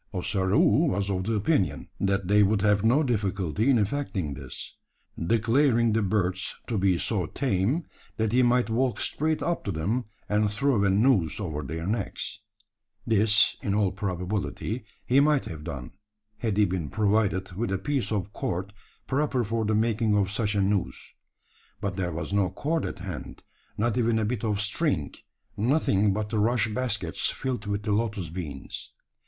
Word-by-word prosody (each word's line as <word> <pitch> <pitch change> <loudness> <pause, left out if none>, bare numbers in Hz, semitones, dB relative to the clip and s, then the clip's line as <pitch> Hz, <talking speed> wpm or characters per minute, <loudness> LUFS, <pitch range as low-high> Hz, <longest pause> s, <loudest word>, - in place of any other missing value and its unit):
Ossaroo 95 +1 +3
was 100 +2 -1
of 95 -1 -1
the 115 - 0
opinion, 105 - +1
that 95 -1 0
they 105 +2 +5
would 100 0 +3
have 105 -1 +3
no 125 +7 +4
difficulty 105 - 0
in 130 - +5
effecting 105 - -1
this; - - -8 0.5
declaring 115 - +3
the 110 - +2
birds 95 -1 0
to 110 -4 -1
be 95 -2 +3
so 95 -3 -1
tame, 130 - 0 0.3
that 110 -1 0
he 125 +2 +4
might 125 0 +3
walk 125 +2 +1
straight 155 +1 0
up 170 0 -1
to 100 - -2
them, 100 +10 -1 0.2
and 105 0 +2
throw 115 0 +1
a 100 - +3
noose 100 - +3
over 80 -7 -3
their 80 +4 -5
necks. 105 0 -3 0.7
This, 110 -1 +4
in 100 - -1
all 100 -3 +2
probability, 100 +4 -3 0.2
he 130 +3 +4
might 145 -1 +3
have 75 -3 -7
done, - - -6 0.5
had 110 -4 -1
he 105 - +5
been 90 -5 -2
provided 100 -3 +1
with 100 +3 -2
a 95 - +1
piece 135 +6 -1
of 100 -1 -2
cord 90 +3 -3 0.3
proper 135 -2 0
for 110 +1 -1
the 110 +1 +1
making 110 -1 +2
of 100 -1 +1
such 105 0 0
a 100 - +2
noose. 100 -2 -1 0.7
But 100 -3 -3
there 90 -2 -2
was 85 +5 -4
no 100 -2 +2
cord 160 +2 -1
at - - -6
hand - - -7 0.3
not 115 +1 +1
even 115 -1 +2
a 110 - +1
bit 115 -1 -2
of 105 -2 0
string 105 - 0 0.4
nothing 105 -4 +2
but 105 +1 -2
the 110 -1 0
rush 115 +1 +2
baskets 105 -6 -1
filled 125 -6 -3
with 100 0 -2
the 105 - -1
lotus 105 -5 -1
beans. 80 -6 -6
105 Hz, 170 wpm, -27 LUFS, 95-115 Hz, 0.7 s, they